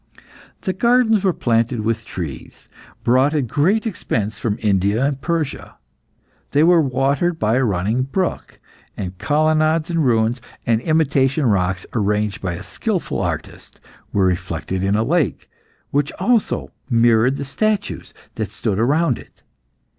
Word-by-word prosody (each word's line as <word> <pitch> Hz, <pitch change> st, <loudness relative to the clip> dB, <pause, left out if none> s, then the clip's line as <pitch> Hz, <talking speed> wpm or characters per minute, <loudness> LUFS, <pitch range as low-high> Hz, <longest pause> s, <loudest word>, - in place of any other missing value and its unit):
The 190 Hz, -, -1 dB
gardens 230 Hz, 0 st, +3 dB
were 190 Hz, -, +3 dB
planted 115 Hz, -4 st, 0 dB
with 115 Hz, 0 st, -2 dB
trees, 80 Hz, -7 st, -7 dB, 0.4 s
brought 130 Hz, +5 st, +3 dB
at 145 Hz, -4 st, +1 dB
great 175 Hz, -, +1 dB
expense 110 Hz, -, -2 dB
from 105 Hz, -2 st, -1 dB
India 100 Hz, +4 st, +1 dB
and 140 Hz, -1 st, -2 dB
Persia. 165 Hz, -4 st, -3 dB, 0.8 s
They 145 Hz, +2 st, +4 dB
were 170 Hz, 0 st, +6 dB
watered 140 Hz, +5 st, +1 dB
by 110 Hz, -3 st, +1 dB
a 135 Hz, -, +2 dB
running 105 Hz, +3 st, 0 dB
brook, 175 Hz, +8 st, -3 dB, 0.4 s
and 95 Hz, -2 st, -5 dB
colonnades 155 Hz, +2 st, +2 dB
in 165 Hz, -, 0 dB
ruins, 120 Hz, -2 st, +2 dB, 0.2 s
and 115 Hz, -1 st, +2 dB
imitation 145 Hz, -2 st, +2 dB
rocks, 95 Hz, -4 st, +1 dB
arranged 105 Hz, -1 st, 0 dB
by 90 Hz, -2 st, -2 dB
a 85 Hz, -, -7 dB
skilful -, -, -2 dB
artist, -, -, -5 dB, 0.3 s
were 100 Hz, -2 st, +2 dB
reflected 90 Hz, 0 st, -2 dB
in 95 Hz, +1 st, +1 dB
a 110 Hz, -, +2 dB
lake, 145 Hz, -, 0 dB, 0.4 s
which 145 Hz, +1 st, +1 dB
also 220 Hz, +3 st, 0 dB, 0.2 s
mirrored 120 Hz, +2 st, +3 dB
the 140 Hz, -, -4 dB
statues 215 Hz, +8 st, -2 dB, 0.2 s
that 110 Hz, -4 st, -3 dB
stood 105 Hz, -1 st, -2 dB
round 145 Hz, +3 st, +2 dB
it. -, -, -17 dB
130 Hz, 140 wpm, -20 LUFS, 105-155 Hz, 0.8 s, were